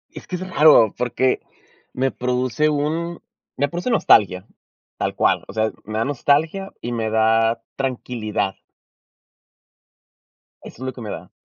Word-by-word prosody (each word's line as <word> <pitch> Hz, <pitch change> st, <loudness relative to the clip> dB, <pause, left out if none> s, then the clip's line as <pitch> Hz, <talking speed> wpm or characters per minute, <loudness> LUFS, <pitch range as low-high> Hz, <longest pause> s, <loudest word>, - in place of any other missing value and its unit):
Es -, -, -10 dB
que 185 Hz, -, -4 dB
es 185 Hz, +1 st, -5 dB
raro 150 Hz, -, +6 dB
porque 125 Hz, +1 st, 0 dB, 0.5 s
me 130 Hz, +1 st, 0 dB
produce 125 Hz, +4 st, 0 dB
un 160 Hz, +4 st, -2 dB, 0.4 s
me 140 Hz, +2 st, +2 dB
produce 175 Hz, -, -3 dB
nostalgia, 100 Hz, -, +4 dB, 0.5 s
tal -, -, -2 dB
cual, -, -, +2 dB
o -, -, -9 dB
sea, 110 Hz, 0 st, 0 dB
me 110 Hz, 0 st, -4 dB
da 115 Hz, -, +1 dB
nostalgia 155 Hz, +8 st, 0 dB
y 120 Hz, -, -4 dB
me 115 Hz, -2 st, -1 dB
da 115 Hz, +1 st, +2 dB
tranquilidad. 120 Hz, -7 st, -2 dB, 2.1 s
Eso -, -, -11 dB
es -, -, -3 dB
lo 130 Hz, -, -3 dB
que 125 Hz, -, -11 dB
me 110 Hz, -3 st, -6 dB
da. 90 Hz, +3 st, -8 dB
125 Hz, 145 wpm, -21 LUFS, 110-150 Hz, 2.1 s, raro